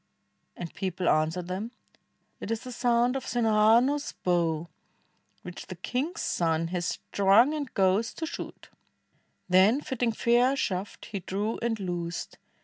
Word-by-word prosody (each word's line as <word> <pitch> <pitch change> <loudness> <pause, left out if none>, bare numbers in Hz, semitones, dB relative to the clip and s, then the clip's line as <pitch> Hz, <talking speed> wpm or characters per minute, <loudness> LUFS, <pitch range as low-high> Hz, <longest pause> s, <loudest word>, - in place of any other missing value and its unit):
and 170 -2 -6
people 185 -2 -3
answered 160 +3 +1
them, 190 +5 -4 0.7
"It - - -6
is 225 0 -1
the 255 - -8
sound 240 +1 +2
of 270 - -2
Sinhahanu's 235 +5 +3
bow, 170 -2 +1 0.8
Which 180 0 -9
the 185 - -7
king's 255 - -3
son 165 -1 0
has 175 -1 -2
strung 205 +8 +3
and 290 -4 -4
goes 195 +4 +2
to 325 - -3
shoot"; 320 - -8 0.8
Then 190 +8 +5
fitting 250 -5 -1
fair 240 +3 +3
a - - -1
shaft, 195 -6 -3
he 200 - -3
drew 205 +5 -3
and 230 -2 -1
loosed. 175 -3 -4
210 Hz, 140 wpm, -28 LUFS, 180-240 Hz, 0.8 s, Then